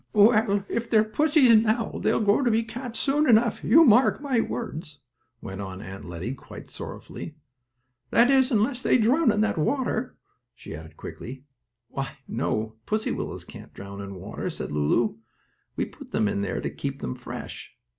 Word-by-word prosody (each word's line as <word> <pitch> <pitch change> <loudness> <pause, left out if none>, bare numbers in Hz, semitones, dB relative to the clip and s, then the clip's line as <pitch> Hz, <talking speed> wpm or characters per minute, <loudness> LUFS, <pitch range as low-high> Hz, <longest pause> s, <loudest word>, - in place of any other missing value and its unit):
"Well, 210 -2 +4
if 230 0 -3
they're 215 -2 +5
pussies 275 +2 +4
now 220 +1 +1
they'll - - +2
grow 205 +4 +3
to 245 - +3
be 225 0 +2
cats 235 +1 -6
soon 295 +1 +2
enough, 230 0 +4
you 325 +3 +7
mark 245 +2 +5
my 275 -5 0
words," 155 -12 -5 0.4
went 95 +1 -6
on 95 -1 -6
Aunt 95 0 -8
Lettie 85 +8 -5
quite 135 - -12
sorrowfully. 155 - -8 0.7
"That 240 +3 +5
is 265 -1 +4
unless 240 +2 +1
they - - +4
drown 250 +4 +4
in 210 0 +1
that 215 -6 +1
water," 250 - -1 0.4
she - - -9
added 80 0 -11
quickly. 130 +3 -8 0.4
"Why, 135 0 -5
no; 110 -1 -2
pussy 215 +1 0
willows - - -4
can't - - -12
drown 100 0 -8
in 100 -1 -7
water," 90 - -5
said - - -6
Lulu. 75 +11 +1 0.6
"We - - 0
put - - -13
them 110 - +1 0.2
there 100 - -2
to - - -2
keep - - -4
them 65 - -3
fresh. - - -8
215 Hz, 170 wpm, -26 LUFS, -, 0.7 s, you